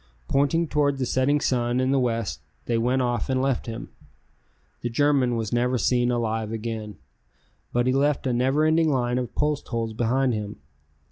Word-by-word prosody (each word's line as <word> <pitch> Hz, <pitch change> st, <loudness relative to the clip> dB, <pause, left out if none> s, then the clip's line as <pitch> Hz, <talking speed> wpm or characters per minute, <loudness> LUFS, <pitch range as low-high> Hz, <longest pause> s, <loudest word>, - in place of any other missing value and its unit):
Pointing 155 Hz, +5 st, +2 dB
toward 145 Hz, -2 st, +1 dB
the 130 Hz, -, -1 dB
setting 130 Hz, +4 st, +2 dB
sun 120 Hz, -3 st, 0 dB
in 130 Hz, +1 st, +1 dB
the 135 Hz, -, +3 dB
west, 115 Hz, -3 st, -1 dB, 0.3 s
they 120 Hz, -, 0 dB
went 125 Hz, +3 st, +1 dB
off 120 Hz, +2 st, -1 dB
and 130 Hz, -1 st, +1 dB
left 135 Hz, -2 st, 0 dB
him. 115 Hz, 0 st, -6 dB, 0.9 s
The 120 Hz, -, -2 dB
German 135 Hz, -1 st, +2 dB
was 110 Hz, -1 st, -3 dB
never 125 Hz, +1 st, +1 dB
seen 120 Hz, +2 st, +2 dB
alive 110 Hz, -2 st, -1 dB
again, 110 Hz, -2 st, -5 dB, 0.8 s
but 120 Hz, 0 st, +1 dB
he 130 Hz, -, +2 dB
left 140 Hz, +1 st, +1 dB
a 130 Hz, -, +1 dB
never 135 Hz, +5 st, +2 dB
ending 160 Hz, 0 st, +3 dB
line 125 Hz, -3 st, +1 dB
of 125 Hz, -, -5 dB
post 150 Hz, -1 st, 0 dB
holes 115 Hz, -2 st, -2 dB
behind 125 Hz, +3 st, +1 dB
him. 105 Hz, -1 st, -4 dB
125 Hz, 180 wpm, -25 LUFS, 115-135 Hz, 0.9 s, the